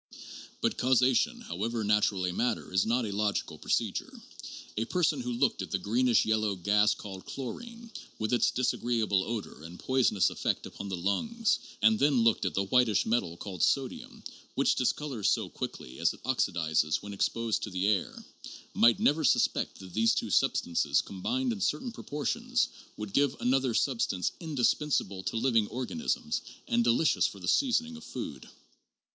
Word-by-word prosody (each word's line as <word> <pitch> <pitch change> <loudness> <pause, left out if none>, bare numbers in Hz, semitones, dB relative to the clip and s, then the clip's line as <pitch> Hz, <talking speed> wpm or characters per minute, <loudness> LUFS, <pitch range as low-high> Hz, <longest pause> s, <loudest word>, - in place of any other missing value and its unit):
But - - 0
causation, 130 - +3
however 115 - -3
natural 105 -2 +2
a 90 - -2
matter, 120 -2 -1
is 95 +3 +2
not 120 +1 +1
a 105 - -4
logical 105 0 -1
procedure. - - -1 0.6
A 110 - -1
person 160 -5 +1
who 125 0 -3
looked 120 -2 +1
at 95 - -5
the 95 - 0
greenish 115 +5 +2
yellow 110 -2 +1
gas 105 +3 +3
called 95 -2 -9
chlorin 230 - -7 0.3
with 110 +2 -2
its 120 - +3
disagreeable 115 -6 0
odor 110 -8 -5
and 85 +2 -10
poisonous 130 -7 +2
effect - - -2
upon 100 - -7
the 95 - -3
lungs 225 - 0 0.2
and 110 0 +5
then 135 -4 +3
looked 115 -1 +2
at - - -2
the 100 - +1
whitish 110 +1 +3
metal 95 -7 0
called 95 -3 -7
sodium 135 -3 -1 0.3
which - - +3
discolors 130 -3 0
so - - 0
quickly 65 +1 -7
as - - +2
it - - -21
oxidizes 80 -1 0
when 100 0 -7
exposed 115 +3 0
to - - -4
the 90 0 -2
air, 100 -4 -1 0.5
might 115 -1 +5
never 155 +2 +2
suspect 135 - +2
that 95 -2 -12
those 115 +1 +3
two - - -2
substances, 75 -4 +2
combined 245 - -2
in 210 - -7
certain 250 +3 -1
proportions, 235 - -1 0.3
would 105 -2 -6
give 140 -1 +2
another 130 -1 +1
substance 115 -9 0
indispensable 145 - 0
to 115 - -3
living 115 -3 +2
organisms 230 - -2 0.3
and 240 -2 +2
delicious 155 - +3
for 100 - -9
the 90 - -7
seasoning 245 - +2
of 235 - -11
food. - - -7
115 Hz, 165 wpm, -29 LUFS, 100-140 Hz, 0.6 s, and